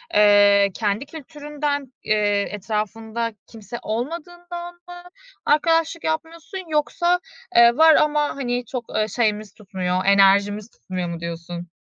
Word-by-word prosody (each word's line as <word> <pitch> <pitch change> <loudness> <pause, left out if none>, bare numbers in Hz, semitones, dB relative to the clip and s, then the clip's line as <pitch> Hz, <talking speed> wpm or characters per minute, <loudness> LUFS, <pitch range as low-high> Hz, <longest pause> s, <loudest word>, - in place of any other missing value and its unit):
ııı, 205 -1 +6
kendi 210 +5 -1
kültüründen, 295 -1 -4 0.3
ııı, 215 - +3 0.3
etrafında 220 +2 -3
kimse 225 +1 -9
olmadığından 345 +8 -5
mı 350 0 -13 0.4
arkadaşlık 325 +2 +2
yapmıyorsun 325 +3 -4
yoksa, 345 +4 +1 0.4
ııı, 235 +1 +7
var 320 0 +7
ama, 300 0 +3
hani, 245 -2 -2
çok 240 0 -5 0.3
şeyimiz 215 -3 0
tutmuyor, 185 -3 -3
enerjimiz 200 +2 +4
tutmuyor 180 -5 -5
mu 170 -1 -5
diyorsun? 170 +1 -6
235 Hz, 110 wpm, -22 LUFS, 205-320 Hz, 0.4 s, ııı